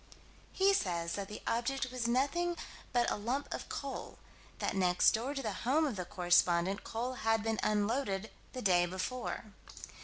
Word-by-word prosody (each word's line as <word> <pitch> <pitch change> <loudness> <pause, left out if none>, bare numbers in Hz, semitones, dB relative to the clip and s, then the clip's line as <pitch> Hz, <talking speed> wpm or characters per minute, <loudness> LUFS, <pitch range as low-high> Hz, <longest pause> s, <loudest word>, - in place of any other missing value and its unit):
He 390 +1 +4
says 170 - 0
that 200 -1 -3
the 210 - -8
object 255 +3 0
was 250 -2 -1
nothing 310 +8 +1 0.3
but 240 -1 +2
a - - +1
lump 245 +7 -2
of - - -6
coal: 280 -1 -5 0.4
that - - -1
next 180 -2 +4
door 250 +6 -2
to 275 - -3
the 215 -3 -1
home 290 +6 +3
of 270 -7 -1
the 180 -2 -3
correspondent 175 +1 +2
coal 240 +3 -3
had 225 -1 +2
been 225 0 0
unloaded 210 -1 0 0.2
the 255 - -5
day 175 -3 +4
before. 210 +3 -4
225 Hz, 165 wpm, -33 LUFS, 195-260 Hz, 0.4 s, He